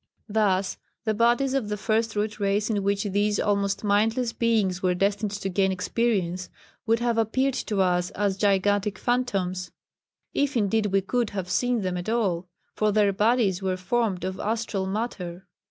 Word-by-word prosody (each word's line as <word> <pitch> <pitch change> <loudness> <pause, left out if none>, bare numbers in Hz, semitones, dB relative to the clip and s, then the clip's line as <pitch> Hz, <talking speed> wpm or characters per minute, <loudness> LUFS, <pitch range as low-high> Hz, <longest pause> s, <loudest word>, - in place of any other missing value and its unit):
Thus 200 -3 +1 0.3
the 220 - +1
bodies 240 +4 +2
of 260 -6 -1
the 210 - -2
First 220 +2 0
Root 210 +1 -2
Race 205 +2 +1
in 205 -2 0
which 200 0 0
these 205 0 +1
almost 200 -1 0
mindless 225 +4 +1
beings 210 -6 +1
were 180 -1 +2
destined 200 +3 0
to 200 -1 -4
gain 190 0 +1
experience, 185 -2 -1 0.4
would 225 +1 +4
have 235 -1 +1
appeared 260 +5 +1
to 205 -5 -1
us 180 -1 +1
as 200 -1 +1
gigantic 205 0 +1
phantoms 195 -8 -1 0.6
if 285 -2 +1
indeed 210 0 +1
we 195 0 +2
could 235 +3 -1
have 185 -1 -3
seen 245 -2 +1
them 185 -2 -2
at 180 +4 -4
all, 190 -7 0 0.3
for 215 0 +1
their 205 -1 +3
bodies 210 -2 +2
were 185 -1 -1
formed 195 0 -1
of 190 0 -3
astral 215 -3 -2
matter. 190 -4 -4
205 Hz, 170 wpm, -26 LUFS, 190-225 Hz, 0.6 s, would